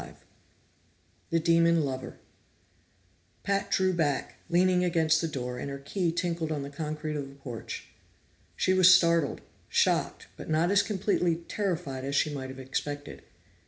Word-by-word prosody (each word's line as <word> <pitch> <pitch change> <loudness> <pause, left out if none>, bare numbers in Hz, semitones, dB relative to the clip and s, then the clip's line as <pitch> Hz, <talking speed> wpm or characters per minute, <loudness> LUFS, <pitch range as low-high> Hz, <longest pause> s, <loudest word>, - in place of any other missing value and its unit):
25 - - -13 1.0
The 165 - +2
Demon 165 0 +4
Lover 130 -1 -5 1.3
Pat 200 0 0
drew 185 0 +2
back, 145 -6 -1
leaning 180 +1 +3
against 160 -2 +2
the 165 - 0
door, 125 -4 -4
and 140 - -4
her 140 - -5
key 170 +5 -1
tinkled 170 -1 -2
on 145 -2 -2
the 140 - -7
concrete 155 +1 -4
of 140 -2 -4
the 135 - -14
porch. 125 -5 -7 0.7
She 185 - +2
was 185 -1 +7
startled, 170 -4 +4 0.3
shocked, - - +1
but - - -9
not 160 +4 +2
as 200 0 +5
completely 195 -4 0
terrified 170 -10 -2
as 140 +1 -2
she 150 +1 +2
might 130 -2 -5
have 130 - -9
expected. 145 +2 -5
160 Hz, 155 wpm, -28 LUFS, 140-175 Hz, 1.3 s, was